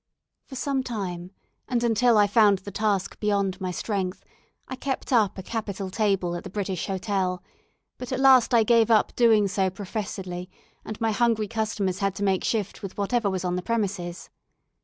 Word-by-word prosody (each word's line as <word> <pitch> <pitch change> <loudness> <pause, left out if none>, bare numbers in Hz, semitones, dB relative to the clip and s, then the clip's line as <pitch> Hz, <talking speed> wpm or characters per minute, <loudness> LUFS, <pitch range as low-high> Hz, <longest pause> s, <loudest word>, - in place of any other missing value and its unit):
For 265 - -9
some 270 0 -1
time, 185 -8 -5 0.4
and 240 -2 0
until 235 0 +3
I 205 - +6
found 205 -1 +4
the 190 +2 -9
task 205 -2 -1
beyond 200 -2 0
my 185 - -2
strength, 190 0 -3 0.4
I 260 - -5
kept 265 0 -3
up 215 -6 +3
a 190 - -6
capital 200 -3 -4
table 195 -5 0
at 175 - -6
the - - -7
British 190 -2 -3
Hotel; 190 -2 -2 0.6
but 250 0 -7
at 260 - -1
last 265 -3 +6
I 235 -2 +5
gave 230 0 +4
up 220 -2 +3
doing 220 -4 +4
so 190 0 0
professedly, 185 -2 -5 0.3
and 215 - -7
my 225 -1 +1
hungry 225 -1 +1
customers 210 -4 -2
had 195 -1 0
to 205 - -4
make 190 -2 +1
shift 210 -4 -2
with 195 -2 -7
whatever 205 +1 0
was 185 -1 -3
on 180 0 -1
the - - -2
premises. 195 -5 -3
205 Hz, 180 wpm, -25 LUFS, 190-230 Hz, 0.6 s, I